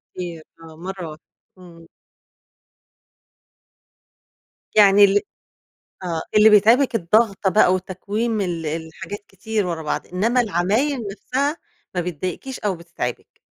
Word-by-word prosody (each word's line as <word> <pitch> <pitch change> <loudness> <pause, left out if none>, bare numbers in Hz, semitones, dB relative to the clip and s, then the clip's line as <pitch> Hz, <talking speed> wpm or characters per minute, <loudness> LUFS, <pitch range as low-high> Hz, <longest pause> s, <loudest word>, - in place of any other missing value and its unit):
كتير 170 -3 -6 0.2
آه، 160 -1 -12
مرّه 185 0 -6
واحدة، 155 +1 -12 0.3
امم. 170 -2 -15 2.9
يعني 205 -1 +7
ال 200 +1 +5 0.8
آه 165 -2 -2 0.2
اللي 215 +1 +8
بيتعبك 230 +5 +5
الضغطة 205 +1 +2
بقى، 185 -2 +4
وتكويم 205 +4 -2
ال 170 -4 -3
الحاجات 160 +6 -5
كتير 210 +2 -3
ورا 165 -2 -3
بعض، 150 - -3
إنّما 225 +8 +1
العمايل 225 - 0
نفسها 275 +9 -2 0.4
ما 180 - +1
بتضايقكيش 180 - -5
أو 200 -3 -1
بتتعبك؟ 170 -7 -6
195 Hz, 110 wpm, -21 LUFS, 170-220 Hz, 2.9 s, اللي